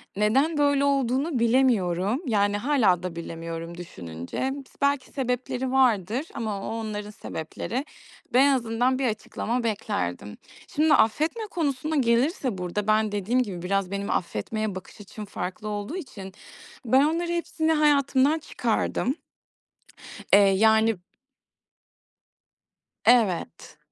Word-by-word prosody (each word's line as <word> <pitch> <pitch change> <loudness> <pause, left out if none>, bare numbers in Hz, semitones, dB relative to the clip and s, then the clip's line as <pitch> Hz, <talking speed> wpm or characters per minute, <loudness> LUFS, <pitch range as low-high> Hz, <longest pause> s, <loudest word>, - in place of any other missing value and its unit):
Neden 265 +10 +2
böyle 285 -1 +3
olduğunu 275 +1 +1
bilemiyorum. 230 - +2
Yani, 205 -3 +2
hâlâ 210 - +2
da 180 -2 -4
bilemiyorum 165 0 -6
düşününce. 90 - -5
Bis 275 -2 -12
belki 280 -1 +2
sebepleri 255 -1 -2
vardır 245 - +2
ama 215 -4 -3
o, - - -3
onların 210 -2 -4
sebepleri. 210 - -5 0.5
Ben 255 - +6
en 280 - +5
azından 245 +1 +1
bir 265 - +1
açıklama 230 +2 -2
beklerdim. 200 - -3 0.4
Şimdi 310 +1 +4
affetme 310 - +2
konusuna 305 -2 -1
gelirse 255 - +1
burada, 180 +3 -3
ben 215 0 +3
dediğim 210 +5 +1
gibi 190 -6 -6
biraz 195 +1 -1
benim 200 0 -3
affetmeye 205 - -2
bakış 185 +3 -10
açım 210 +1 -9
farklı 200 +1 -5
olduğu 210 - -4
için 200 - -8 0.5
ben 260 +4 +5
onların 340 +2 0
hepsini 325 -2 -1
hayatımdan 290 -1 +3
çıkardım. 245 -1 -1 1.2
Eee, 200 -1 +7
yani 220 0 +4 2.1
Evet. 200 -10 +2
225 Hz, 120 wpm, -25 LUFS, 200-270 Hz, 2.1 s, Eee